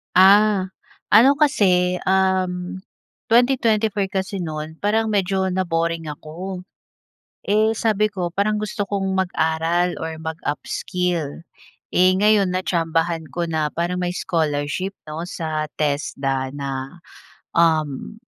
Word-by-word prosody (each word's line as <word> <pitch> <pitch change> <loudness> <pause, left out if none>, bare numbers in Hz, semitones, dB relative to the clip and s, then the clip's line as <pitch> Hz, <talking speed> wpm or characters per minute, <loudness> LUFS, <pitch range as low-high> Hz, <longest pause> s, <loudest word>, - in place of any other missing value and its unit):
Ah, 195 +1 +6 0.4
ano 270 +8 +6
kasi 180 -11 +3
um, 185 -1 0 0.5
2024 225 -4 +3
kasi 190 -1 -2
noon 155 0 -5
parang 220 +2 +2
medyo 195 -2 +1
na-boring 165 -3 -1
ako. 180 +5 -8 0.8
Eh, 215 +2 +2
sabi 215 -1 +1
ko 180 -4 -3
parang 210 +3 0
gusto 210 -1 -3
kong 195 -1 -1
mag-aral 170 0 0
or 160 0 -4
mag-upskill. 165 0 -3 0.5
Eh, 185 +1 +4
gayon 200 -2 +3
na-tsambahan 165 -2 0
ko 170 -1 -2
na 155 -1 0
parang 175 +2 -1
may 180 0 -2
scholarship 160 +2 -1 0.2
'no 165 +3 -5
sa 155 -3 -3
TESDA 135 -2 -1
na 140 +4 -5 0.5
um, 155 - +1
180 Hz, 110 wpm, -21 LUFS, 160-195 Hz, 0.8 s, Ah